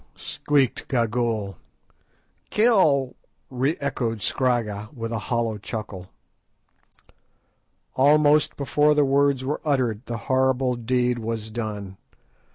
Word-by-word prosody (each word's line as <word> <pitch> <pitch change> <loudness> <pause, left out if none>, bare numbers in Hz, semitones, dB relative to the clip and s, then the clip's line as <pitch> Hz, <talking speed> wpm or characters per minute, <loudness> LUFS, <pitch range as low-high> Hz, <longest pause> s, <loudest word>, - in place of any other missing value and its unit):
_" - - -24
squeaked 140 -4 0
Gagool. 115 -4 -1 0.9
"Kill!" 185 - +3 0.4
re 130 +5 0
echoed 115 -6 -2
Scragga, 110 -5 -1
with 115 -1 -5
a 115 - -2
hollow 115 -3 -1
chuckle. 100 -4 -7 1.9
Almost 150 +2 +4
before 150 +1 +2
the 145 -1 +4
words 140 -1 +2
were 145 +3 -2
uttered 125 -7 0
the 120 - -3
horrible 130 -1 +2
deed 125 +1 0
was 110 -1 -4
done. 105 -4 -5
125 Hz, 105 wpm, -24 LUFS, 115-140 Hz, 1.9 s, Almost